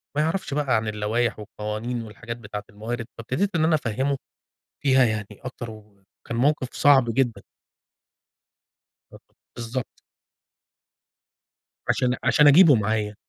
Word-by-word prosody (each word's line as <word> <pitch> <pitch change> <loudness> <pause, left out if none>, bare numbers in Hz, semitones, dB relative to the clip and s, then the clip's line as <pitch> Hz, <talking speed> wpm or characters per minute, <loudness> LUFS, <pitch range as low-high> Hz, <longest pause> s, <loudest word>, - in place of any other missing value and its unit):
ما 150 - +2
يعرفش 160 0 -1
بقى 140 -4 +1
عن 110 -1 0
اللوايح 110 +2 -1
والقوانين 105 +3 -4
والحاجات 115 +2 -8
بتاعة 105 -2 -7
الموارد، 115 +3 -5
فابتديت 130 - -2
إن 160 - +2
أنا 160 0 +4
أفهّمه 135 +1 -1 0.7
فيها 130 -2 +5
يعني 110 -3 -1
أكتر، 120 +2 -8
وكان 105 -2 -15 0.3
موقف 135 +1 +1
صعب 140 -3 +5
جدًا. 125 -2 0 1.7
ب - - -12 0.4
بالضبط. 120 0 -5 1.9
عشان 125 0 +2
عشان 150 -1 +5
أجيبه 155 0 +8
معايا، 105 -1 -1
120 Hz, 115 wpm, -24 LUFS, 110-135 Hz, 1.9 s, أجيبه